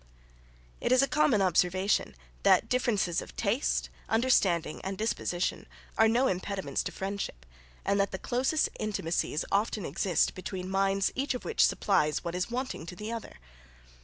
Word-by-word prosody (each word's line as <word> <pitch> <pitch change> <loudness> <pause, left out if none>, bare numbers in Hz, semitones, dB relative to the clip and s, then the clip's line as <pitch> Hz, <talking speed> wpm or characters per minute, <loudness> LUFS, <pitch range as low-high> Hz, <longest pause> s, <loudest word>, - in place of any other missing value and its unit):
It - - -1
is 255 +1 +6
a - - +2
common 265 -8 +3
observation 185 - +2 0.3
that - - +4
differences 215 -9 +1
of - - -11
taste, - - 0 0.2
understanding, 195 -9 +2
and 190 0 -4
disposition, 190 -4 -2 0.3
are 220 - +5
no 240 +4 +3
impediments 185 - -1
to - - -3
friendship, 195 - -5 0.4
and 200 - +2
that 200 - +2
the 190 - -5
closest 260 +9 +1
intimacies 170 -6 -1
often 205 -1 0
exist 175 +3 +1
between 185 0 -6
minds 195 0 +2
each 270 0 -1
of 250 - -6
which 455 - +4
supplies 155 -8 +1
what 170 -1 -4
is 180 +3 -2
wanting 250 -8 -4
to 180 - -7
the 210 +5 -6
other. 230 -2 -6
195 Hz, 155 wpm, -29 LUFS, 175-230 Hz, 0.4 s, is